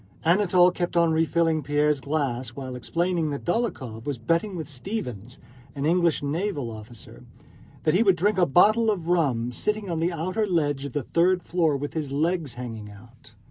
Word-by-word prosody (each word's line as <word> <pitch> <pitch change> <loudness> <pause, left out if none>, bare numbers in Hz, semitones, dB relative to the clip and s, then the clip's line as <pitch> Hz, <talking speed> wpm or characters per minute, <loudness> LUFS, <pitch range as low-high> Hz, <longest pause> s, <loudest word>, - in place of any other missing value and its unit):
Anatole 180 0 +4
kept 175 -1 -2
on 170 -1 +4
refilling 165 0 +2
Pierre's 145 +1 +1
glass 135 -4 -2
while 130 -2 -6
explaining 170 +5 -1
that 140 -1 -5
Dólokhov 135 - -2
was 145 -1 -3
betting 165 - 0
with 160 -4 -5
Stevens, 125 - -5 0.4
an 140 0 -2
English 170 -2 +2
naval 145 - -2
officer, 110 0 -11 0.6
that 155 - +2
he 185 - +4
would 195 -5 +4
drink 200 +2 +1
a 175 - +4
bottle 215 +9 +4
of 175 -6 -2
rum 130 -9 +1
sitting 210 - -2
on 165 - -1
the 170 +2 +1
outer 185 +6 -1
ledge 145 -6 0
of 140 - -6
the 145 - -2
third 175 +5 +2
floor 165 -3 +1
window 140 - -3
with 145 - -4
his 150 -4 -3
legs 160 0 -1
hanging 115 -4 -7
out. 115 +3 -16
160 Hz, 180 wpm, -25 LUFS, 135-180 Hz, 0.6 s, Anatole